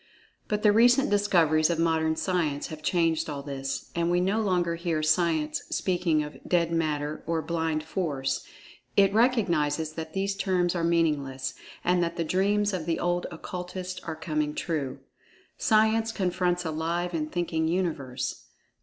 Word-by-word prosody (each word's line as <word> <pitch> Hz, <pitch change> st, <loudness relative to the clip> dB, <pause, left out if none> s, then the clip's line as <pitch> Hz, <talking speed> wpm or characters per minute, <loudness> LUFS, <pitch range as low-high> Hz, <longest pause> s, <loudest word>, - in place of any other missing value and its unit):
But 210 Hz, 0 st, -1 dB
the 210 Hz, -, +6 dB
recent 245 Hz, +3 st, +5 dB
discoveries 170 Hz, -6 st, +3 dB
of 170 Hz, -, 0 dB
modern 160 Hz, -1 st, +2 dB
Science 160 Hz, -6 st, -1 dB
has 155 Hz, -1 st, -8 dB
changed 165 Hz, -2 st, +1 dB
all 140 Hz, -2 st, -5 dB
this, 135 Hz, -1 st, -5 dB
and 170 Hz, 0 st, 0 dB
we 175 Hz, 0 st, +3 dB
no 195 Hz, +5 st, +1 dB
longer 180 Hz, -4 st, +1 dB
hear 165 Hz, -2 st, -1 dB
Science 155 Hz, -1 st, +1 dB
speaking 175 Hz, -4 st, +1 dB
of 150 Hz, 0 st, -8 dB
"dead 170 Hz, -2 st, +1 dB
Matter" 155 Hz, -2 st, -1 dB
or 165 Hz, -1 st, 0 dB
"blind 160 Hz, -1 st, -1 dB
Force"—it 160 Hz, +4 st, -1 dB
recognizes 170 Hz, -, +2 dB
that 160 Hz, 0 st, -6 dB
these 195 Hz, +1 st, -1 dB
terms 185 Hz, -3 st, +1 dB
are 170 Hz, -2 st, -1 dB
meaningless, 150 Hz, -6 st, 0 dB, 0.3 s
and 180 Hz, 0 st, +2 dB
that 170 Hz, 0 st, -1 dB
the 170 Hz, -, -1 dB
dreams 200 Hz, +4 st, +1 dB
of 175 Hz, -3 st, -3 dB
the 165 Hz, -, 0 dB
old 175 Hz, 0 st, 0 dB
Occultists 180 Hz, 0 st, -6 dB
are 160 Hz, -, -4 dB
coming 155 Hz, -1 st, -2 dB
true. 150 Hz, -6 st, -3 dB, 0.6 s
Science 220 Hz, +1 st, +3 dB
confronts 180 Hz, -3 st, 0 dB
a 160 Hz, -, -1 dB
live 170 Hz, +3 st, -2 dB
and 155 Hz, -2 st, -2 dB
thinking 165 Hz, -2 st, -1 dB
Universe. 140 Hz, -8 st, -2 dB
170 Hz, 155 wpm, -27 LUFS, 155-185 Hz, 0.6 s, the